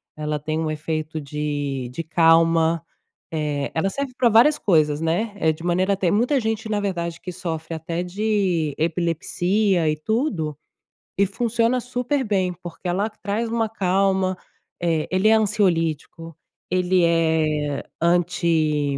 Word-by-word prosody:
ela 150 0 -2
tem 155 +2 -2
um 160 -1 -1
efeito 155 +1 -3
de 145 -3 -3
de 165 +6 -4
calma. 165 0 +3 0.5
Eh, 150 -3 -2
ela 165 +4 +1
serve 275 +4 -4
pra 240 - +4
várias 240 +8 +5
coisas, 155 -5 +2
né. 175 +7 0
É 160 -2 +3
de 155 +1 -8
maneira 185 +3 +1
tem 180 -3 +1
muita 245 +7 +2
gente, 220 -1 -2
na 210 -1 0
verdade, 170 -4 -3
que 180 - -6
sofre 165 -2 -5
até 165 +2 -3
de 185 -5 0
epilepsia 175 +3 +1
e 155 - +1
tudo, 165 - -1 0.6
e 200 - +4
funciona 230 +4 0
super 250 +3 -1
bem, 190 -4 +1
porque 175 +1 -8
ela 195 +5 0
traz 215 +2 -3
uma 225 -1 0
calma. 190 -2 +1 0.5
Eh, 165 -3 +1
ele 190 +4 +3
é - - +6
ansiolítico, 165 -6 0 0.3
ele 180 0 +2
é 155 -3 +1 0.2
anti 165 -4 +1
170 Hz, 140 wpm, -22 LUFS, 160-205 Hz, 0.6 s, é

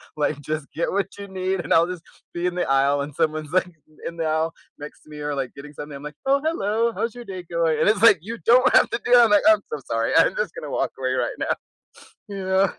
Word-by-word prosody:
like, 150 -1 -1
just 155 0 -4
get 170 - -2
what 200 0 0
you 200 - -7
need" 190 0 -2
And 155 - -1
I'll 165 +1 +5
just 180 -2 -7 0.3
be 175 +1 -3
in 180 0 -1
the 180 - 0
aisle, 140 +1 +3
and 145 0 -6
someone's, 155 -1 -1
like, 185 0 +2
in 155 -3 -23
in 170 - -6
the 165 -1 -1
aisle 160 +1 0 0.3
next 145 +1 -10
to - - -20
me, 150 - -10
or 145 -1 -3
like 135 -2 -4
getting 145 +1 -11
something, 145 0 -8
I'm 140 - -12
like, 150 -1 -8
"Oh, 275 +1 +3
hello. 230 -6 0
How's 230 0 -2
your 240 -1 -9
day 185 -3 -7
going?" 170 -2 0
And - - +4
it's 210 -2 +1
like, 230 -7 +7
you 225 +6 -6
don't 255 +2 +5
have - - +5
to 235 - -2
do - - -2
that. 240 -1 +8
I'm - - +1
like, 205 - +5
"I'm 325 - +6
so - - -3
sorry. - - 0
I'm - - +4
just - - -2
gonna - - -7
walk - - -1
away - - -1
right - - -1
now." - - -1 0.7
You 195 -2 -5
know? 190 0 +2
175 Hz, 270 wpm, -23 LUFS, 150-210 Hz, 0.7 s, that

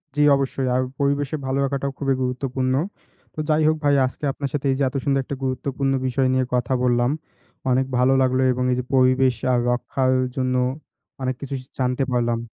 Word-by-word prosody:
জি 150 - +1
অবশ্যই 135 -1 -1
আর 130 - +2 0.2
পরিবেশের 140 +1 0
ভালো 130 +1 -1
রাখাটাও 140 0 -2
খুবই 135 -2 +1
গুরুত্বপূর্ণ। 130 0 -1 0.6
তো - - -8
যাই 155 0 +3
হোক 155 - +3
ভাই 145 -1 +4
আজকে 130 +3 -7
আপনার 140 0 -4
সাথে 145 -1 -2
এই - - +1
যে - - +2
এত 140 - -15
সুন্দর 135 -1 +2
একটা 140 - -5
গুরুত্বপূর্ণ 135 +1 -1 0.2
বিষয় 130 +1 +1
নিয়ে 130 0 +2
কথা 125 +1 0
বললাম, 120 0 +2 0.6
অনেক 130 +1 +2
ভালো 125 +2 +4
লাগলো 130 0 +2
এবং 125 - -2
এই - - +2
যে - - -2
পরিবেশ 130 0 +4 0.2
আ - - +4
রক্ষার 130 +1 0 0.2
জন্য 130 -1 0 0.7
অনেক 130 0 -1
কিছু 140 -1 -4
শি 130 - -18
জানতে 125 +1 +1
পারলাম। 120 -1 +1
130 Hz, 190 wpm, -22 LUFS, 125-140 Hz, 0.7 s, ভাই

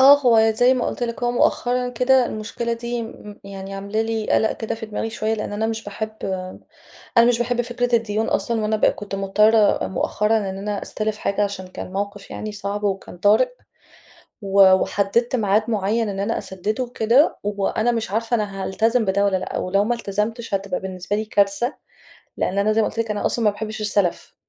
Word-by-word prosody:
آه، 280 +2 +9
هو 225 -3 +5
زي 245 +4 +4
ما 250 - -1
قُلت - - -4
لِك، 235 0 -3
هو 240 - +2
مؤخرًا 250 +1 +1
كده 250 +1 +3
المشكلة 220 +2 -4
دي 235 0 -3
م 210 -2 -10
يعني 195 0 -7
عاملة 200 +3 -2
لي 225 -1 -2
قلق 220 - +3
كده 225 0 -4
في 225 0 -7
دماغي 220 +1 -3
شوية، 220 0 -1
لإن 210 -1 -4
أنا 220 +2 -1
مش 225 0 -3
باحب 215 +2 -5 1.1
أنا 235 - +8
مش 240 -1 +3
باحب 240 0 0
فكرة 245 0 0
الديون 220 -1 0
أصلًا، 230 -2 0
وأنا 215 0 0
بقى - - +3
كنت 205 -1 -6
مضطرة 210 +2 +3
مؤخرًا 210 +4 +1
إن 195 -2 -3
أنا 205 0 -3
أستلِف 215 0 -3
حاجة 200 +1 0
عشان 195 -2 -4
كان 185 0 -8
موقف 200 0 -4
يعني 215 0 -5
صعب 205 0 -4
وكان 195 -3 -3
طارئ، 205 - +4 0.9
و 195 -1 +6
وحدِدت 205 +6 +1
ميعاد 210 -1 +2
مُعين 215 +1 0
إن 195 - -4
أنا 205 +3 -1
أسددُه 210 +6 -3
وكده، 245 +4 +2
وأنا 205 +3 0
مش 225 -4 -2
عارفة 230 +2 0
أنا 200 -3 -3
هالتزم 225 +4 +1
بده 200 +1 +2
والّا 195 -2 +2
لأ، 185 - -4
ولو 195 +2 +1
ما 240 +3 0
التزمتش 225 +1 -3
هتبقى 195 -2 -1
بالنسبة 190 +1 -4
لي 215 - -2
كارثة، 205 +5 +1 0.6
لإن 195 - -1
أنا 215 +2 +2
زي 225 - +3
ما - - +2
قُلت 230 - -6
لِك 225 -2 0
أنا 205 - -2
أصلًا 230 -2 0
ما 210 - +5
باحبش 215 +1 -6
السلف، 200 -4 -1
215 Hz, 195 wpm, -22 LUFS, 200-230 Hz, 1.1 s, آه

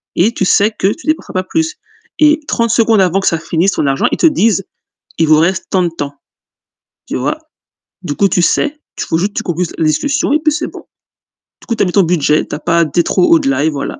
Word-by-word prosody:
et 200 +7 +3
tu 190 - -1
sais 205 +3 +3
que - - +1
tu 340 - -14
dépenseras 310 +1 -2
pas 185 - -1
plus». 320 - -2 0.4
Et 305 0 +4
30 230 -1 0
secondes 225 -2 +3
avant 185 +1 +2
que - - -1
ça 165 - +1
finisse 165 +4 0
ton 145 - -1
argent, 135 0 0
ils - - -1
te - - +4
disent: 225 - +2 0.6
«Il 165 - +3
vous 155 0 +5
reste 175 +4 0
tant 185 -1 +1
de 175 - 0
temps», 145 -4 -6 0.9
tu - - -3
vois? 315 - -2 0.6
Du 155 -6 -4
coup 200 - +2
tu 180 - +1
sais, 300 - 0 0.2
tu - - -4
rajoutes 180 +6 0
tu - - -2
concluse 175 -1 -2
la 160 - 0
discussion 285 - 0
et 305 - +3
puis 310 0 +1
c'est 310 - -2
bon. - - -12 0.7
Du - - -18
coup, 230 - -1
tu - - +1
as - - +1
mis 180 - -2
ton 195 +1 +3
budget, 160 -3 +1
tu - - -5
as 150 - -7
pas 170 0 +1
dé 170 +3 0
trop - - +1
au-delà, 300 - +2
et - - +3
voilà. 145 -3 -5
190 Hz, 245 wpm, -14 LUFS, 165-275 Hz, 0.9 s, vous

